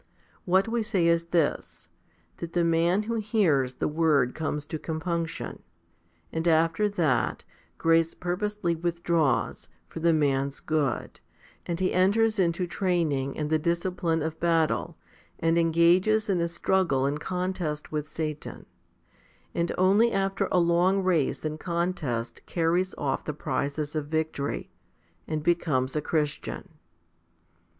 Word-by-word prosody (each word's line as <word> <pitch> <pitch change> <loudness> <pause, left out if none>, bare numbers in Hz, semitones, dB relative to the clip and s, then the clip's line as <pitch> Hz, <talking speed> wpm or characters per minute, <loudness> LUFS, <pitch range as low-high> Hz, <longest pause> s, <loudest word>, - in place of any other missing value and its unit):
What 190 +3 +3
we 230 +1 0
say 205 -6 +1
is 170 0 +3
this, 170 -3 -1 0.5
that 170 -1 -7
the 175 - +2
man 170 +4 +2
who 230 +2 -2
hears 175 - +1
the - - -1
word 150 -5 +2
comes 150 -2 -3
to 155 - -5
compunction, 165 +1 -3 0.7
and 160 +1 -2
after 165 +5 +3
that, 165 -10 0 0.3
grace 165 0 +2
purposely 180 0 -2
withdraws, 170 -3 0 0.2
for - - -8
the 170 +1 +3
man's 140 -3 +1
good, 150 -6 -1 0.5
and 170 -1 -2
he 185 0 +1
enters 215 +4 +3
into 175 0 +1
training 165 -8 -1
and 150 0 -2
the 155 - +3
discipline 170 -1 0
of 160 0 -4
battle, 165 -2 +1 0.4
and 165 +1 +2
engages 175 +6 +3
in 180 -3 +1
a 170 - +1
struggle 170 -5 +1
and 145 +2 -1
contest 180 -4 -3
with 150 0 -3
Satan, 155 -2 -5 0.9
and 170 0 0
only 200 +6 +4
after 195 0 0
a - - +3
long 175 +3 +3
race 165 -6 +1
and 155 0 -3
contest 170 -9 -2
carries 175 +2 0
off 135 -2 -1
the 150 - -4
prizes 145 +2 -3
of 150 -2 -2
victory, 155 -2 -2 0.6
and 155 -1 -2
becomes 155 -6 +1
a 150 - +1
Christian. 150 +5 -2
170 Hz, 135 wpm, -27 LUFS, 155-180 Hz, 0.9 s, only